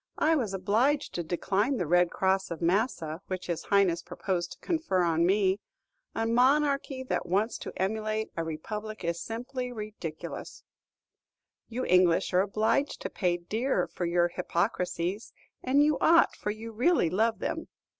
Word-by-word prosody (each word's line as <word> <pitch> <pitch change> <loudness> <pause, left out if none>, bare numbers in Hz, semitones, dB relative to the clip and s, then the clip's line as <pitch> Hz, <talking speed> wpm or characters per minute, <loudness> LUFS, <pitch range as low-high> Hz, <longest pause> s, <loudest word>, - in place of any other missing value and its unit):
I 320 +1 +3
was 240 -9 -1
obliged 235 +10 +1
to 175 - -2
decline 200 - 0
the 180 - -1
Red 175 +2 +4
Cross 190 +1 0
of 170 - -5
Massa 175 -3 0
which 185 -1 -4
his 170 -2 -3
Highness 195 -4 +3
proposed 175 -1 -3
to - - -18
confer 320 - 0
on 170 0 +2
me. 195 0 +2 0.6
A 225 - 0
monarchy 270 +3 +2
that 255 - -2
wants 205 +6 0
to - - -7
emulate 215 +2 -1
a 165 - -1
republic 210 +7 -6
is 170 0 -2
simply 250 +2 -4
ridiculous." 210 -8 -7 1.1
"You 245 +2 -3
English 180 -1 +3
are 180 - +5
obliged 215 +8 0
to - - -4
pay 180 -3 0
dear 215 +3 -1
for 175 - -4
your 175 0 +2
hypocrisies; 180 +2 -2 0.3
and 275 +3 +3
you 300 -1 +2
ought, 335 +1 +5
for - - -4
you 220 +2 -5
really 240 - +2
love 220 +4 +2
them." - - -3
200 Hz, 155 wpm, -29 LUFS, 175-235 Hz, 1.1 s, are